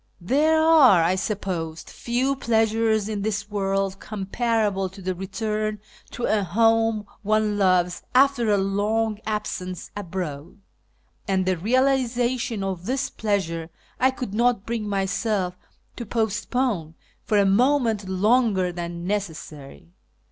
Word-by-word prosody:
There 295 - +2
are, 300 - +6
I 170 +3 +2
suppose, 185 -5 -3
few 255 +3 -1
pleasures 225 -3 +1
in 210 -2 -3
this 210 0 -3
world 195 -1 -1
comparable 210 -1 -1
to 190 +2 -14
the 185 0 -2
return 210 +3 -3 0.3
to 240 - -7
a 215 -3 +2
home 225 +3 +2 0.2
one 215 0 +1
loves 180 -2 +2
after 265 -3 +4
a 205 - +4
long 205 +2 0
absence 185 -4 -4
abroad; 175 -3 -5 0.7
and 190 -2 +1
the 185 0 +1
realisation 245 +1 +1
of 185 -2 -4
this 265 +2 -1
pleasure 170 -6 -2 0.3
I 260 - +4
could 255 -5 -5
not 235 -2 +1
bring 225 -3 -3
myself 195 -1 -1 0.4
to 235 - -5
postpone 220 -5 -1 0.3
for 210 - +1
a 200 - +4
moment 225 -1 +2
longer 200 -1 +2
than 170 0 -6
necessary. 165 -6 -5
210 Hz, 125 wpm, -24 LUFS, 190-230 Hz, 0.7 s, are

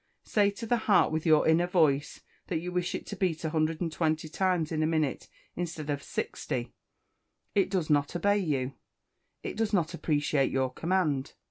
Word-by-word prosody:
Say 205 -2 +2
to 205 +3 -6
the 240 +2 +2
heart, 180 -5 +5
with 160 +1 -1
your 155 -1 +5
inner 165 +2 +4
voice, 155 -5 +2 0.3
that 170 - -1
you 175 +3 -4
wish 180 0 -1
it - - -5
to 205 - -6
beat 175 -4 -1
120 160 0 0
times 180 -2 0
in 155 -1 0
a 155 - +2
minute, 155 -4 -1 0.3
instead 160 -4 -4
of 140 -1 -2
60. 120 -3 -4 0.8
It 195 -2 +2
does 185 -5 0
not 145 +2 +2
obey 205 +3 +2
you; 140 -7 -1 0.7
it - - -4
does 220 -1 -1
not 170 -3 +1
appreciate 145 -4 +1
your 130 -1 0
command. 160 -6 0
160 Hz, 170 wpm, -29 LUFS, 150-180 Hz, 0.8 s, heart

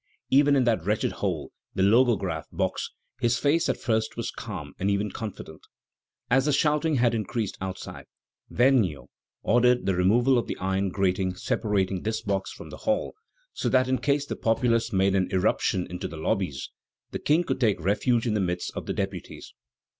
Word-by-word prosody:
Even 140 +1 +5
in 135 - +3
that 115 -8 +1
wretched 105 +4 0
hole, - - -3 0.2
the 95 - +2
Logograph 100 -7 +2
box, - - -2 0.3
his 120 -1 +2
face 150 +6 +2
at - - 0
first 110 -1 -1
was 115 - -3
calm 90 -10 -7
and 95 - 0
even 100 +1 0
confident. 100 -7 -7 0.7
As 135 +2 +3
the 150 - +2
shouting 150 +2 +2
had 120 -2 +3
increased 115 -1 -2
outside, 95 0 -6 0.4
Vergniaud 110 - +2 0.3
ordered 125 +2 +3
the 95 - +2
removal 120 +8 +3
of 115 - -4
the - - -4
iron 95 +1 0
grating 95 -1 0
separating 95 -1 -1
this 110 +1 -2
box 100 -1 -2
from - - -10
the - - -8
hall, 270 -1 -1 0.4
so - - -1
that 130 0 +3
in 130 0 +1
case 145 0 +1
the - - -4
populace 115 0 +1
made 95 -1 +2
an 95 -2 +1
irruption 95 0 +1
into 90 0 -5
the 80 - -9
lobbies, 80 -4 -2 0.4
the - - -4
King 155 +4 +2
could 165 - -2
take 110 -7 +2
refuge 105 +7 +1
in 115 - 0
the 105 - +1
midst 90 -1 -2
of - - -5
the - - -1
deputies. - - -5
110 Hz, 180 wpm, -26 LUFS, 95-125 Hz, 0.7 s, Even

